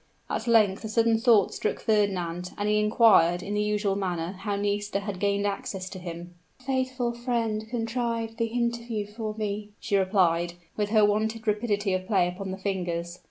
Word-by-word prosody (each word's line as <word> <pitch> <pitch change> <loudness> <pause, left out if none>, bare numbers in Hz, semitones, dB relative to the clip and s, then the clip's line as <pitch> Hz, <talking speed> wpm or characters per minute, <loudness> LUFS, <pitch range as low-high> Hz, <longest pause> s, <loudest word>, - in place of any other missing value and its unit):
At 230 - -2
length 215 -4 +4
a 220 - -4
sudden 225 0 +3
thought 225 -5 +4
struck - - -2
Fernand, 180 -5 0
and 205 - -1
he 210 0 +3
inquired, 210 -6 +4
in 205 - -4
the 210 - +1
usual 210 -1 0
manner, 180 -3 -2
how 200 +1 -3
Nisida 205 0 -1
had 200 -2 -5
gained 200 +1 +1
access 195 -2 -3
to 190 - -8
him? 175 0 -7 0.3
"A - - -20
faithful 260 -2 -1
friend 230 -3 -2
contrived 230 -1 -2
the 230 -1 +1
interview 235 -2 -2
for 215 +1 -5
me," 210 -1 -3
she 200 - -1
replied, 180 -3 +2 0.2
with 210 -1 -1
her 215 -1 +5
wonted 220 +2 0
rapidity 210 -2 0
of 185 0 -2
play 190 -4 +3
upon 190 +2 -5
the 190 - -4
fingers. 180 -3 -3
205 Hz, 180 wpm, -27 LUFS, 190-225 Hz, 0.3 s, her